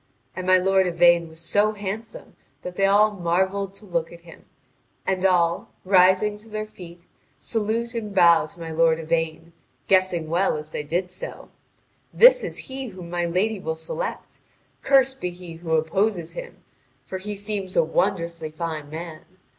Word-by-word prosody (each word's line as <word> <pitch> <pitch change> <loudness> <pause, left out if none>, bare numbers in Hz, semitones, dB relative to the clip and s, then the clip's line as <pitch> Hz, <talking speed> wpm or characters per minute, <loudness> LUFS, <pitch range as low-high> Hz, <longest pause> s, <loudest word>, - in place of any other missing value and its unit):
And 185 0 -5
my 185 0 +6
lord 190 0 +3
Yvain 170 -1 +4
was 160 0 -14
so 205 +6 +1
handsome 210 +2 -7 0.3
that 180 0 -6
they 195 0 +3
all 210 +2 +5
marvelled 190 +1 -1
to 210 - -11
look 170 -3 -2
at 170 0 -13
him, 170 -1 -15 0.6
and 190 -1 -1
all, 170 -2 +1 0.2
rising 190 +2 +4
to 220 +1 -15
their 215 0 -4
feet, 175 -5 -13 0.4
salute 230 +1 -2
and 220 -3 -4
bow 170 -5 +5
to 170 - -17
my 165 -1 -6
lord 160 0 +3
Yvain, 165 +1 -2 0.3
guessing 185 -4 +2
well 170 +1 +1
as 150 +1 -9
they - - -3
did 175 +5 -2
so: 180 - -8 0.6
"This - - +7
is - - -5
he 265 0 -5
whom 180 -5 -10
my 175 0 -1
lady 195 +5 0
will 160 -3 -3
select. 160 - -5 0.4
Cursed 270 -1 +3
be 180 - -1
he 175 -1 -10
who 165 -1 -4
opposes 175 +2 0
him! - - -9 0.4
For 190 - -5
he 205 +2 -5
seems 200 -2 -4
a 170 - +6
wonderfully 170 -1 -1
fine 155 -2 -5
man. 160 0 -7
180 Hz, 170 wpm, -24 LUFS, 170-205 Hz, 0.6 s, This